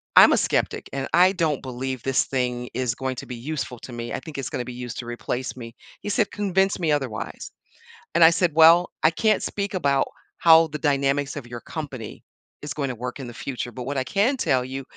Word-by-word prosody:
"I'm - - +9
a - - +3
skeptic, - - -1
and 135 -1 -2
I 180 +2 +6
don't 160 -6 0
believe 130 -1 -4
this 135 -1 +2
thing 125 -2 -2
is 125 -1 -1
going 130 0 -3
to - - -6
be 125 - -7
useful 125 -1 -5
to 130 - -10
me, 120 0 -5
I - - -2
think 150 -1 -9
it's 135 -1 -3
gonna 125 - -3
be 125 - -6
used 120 -1 -7
to 120 - -5
replace 120 +2 -4
me." 115 -2 -9 0.3
He - - -5
said, 205 0 +1
"Convince 195 -2 +1
me 165 -3 +1
otherwise," 135 -7 -4 0.6
and 170 - +6
I 165 - +10
said, 170 -2 +1
"Well, 165 +2 +7
I 155 - +7
can't 215 +4 +2
speak 200 -1 -3
about 140 -6 +2 0.3
how 165 -1 +7
the 150 - -5
dynamics 140 -1 +1
of 125 - -7
your 120 -1 -7
company 135 -9 -7 0.4
is 145 -1 -5
going 140 -3 -2
to 130 - -2
work 125 +3 -6
in 130 - -6
the 120 - -8
future, 125 -1 -5
but 125 +1 -7
what 140 +2 -3
I 130 - +1
can 215 +8 +2
tell 130 - +1
you 135 +1 -5
135 Hz, 230 wpm, -24 LUFS, 125-165 Hz, 0.6 s, I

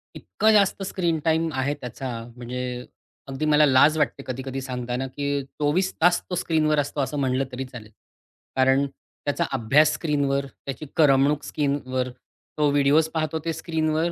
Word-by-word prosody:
इतकं 220 - +1
जास्त 200 -1 +3
screen 175 -4 -1
time 160 0 +2
आहे 140 +2 0
त्याचा 130 +1 -6 0.3
म्हणजे 125 0 -5 0.4
अगदी 135 +3 -3
मला 150 0 +5
लाज 145 +3 +5
वाटते 140 -2 0
कधी-कधी 130 +1 -4
सांगताना, 125 0 -3
की 140 +1 -2
24 150 +7 -1
तास 175 +1 +4
तो 180 - -2
स्क्रीनवर 155 -3 +1
असतो 145 0 -1
असं 135 +2 -2
म्हटलं 130 -1 +1
तरी 130 +1 -4
चालेल. 120 -4 -11 0.6
कारण 130 +1 +3
त्याचा 140 +1 -5
अभ्यास 140 +7 +4
स्क्रीनवर, 140 -3 0 0.2
त्याची 135 +2 -5
करमणूक 145 -1 +4
स्क्रीनवर, 130 -3 -1 0.5
तो 150 -1 +3
व्हिडिओज 145 +2 +4
पाहतो 160 0 -1
ते 165 - 0
स्क्रीनवर, 160 +1 -1
145 Hz, 150 wpm, -24 LUFS, 130-155 Hz, 0.6 s, मला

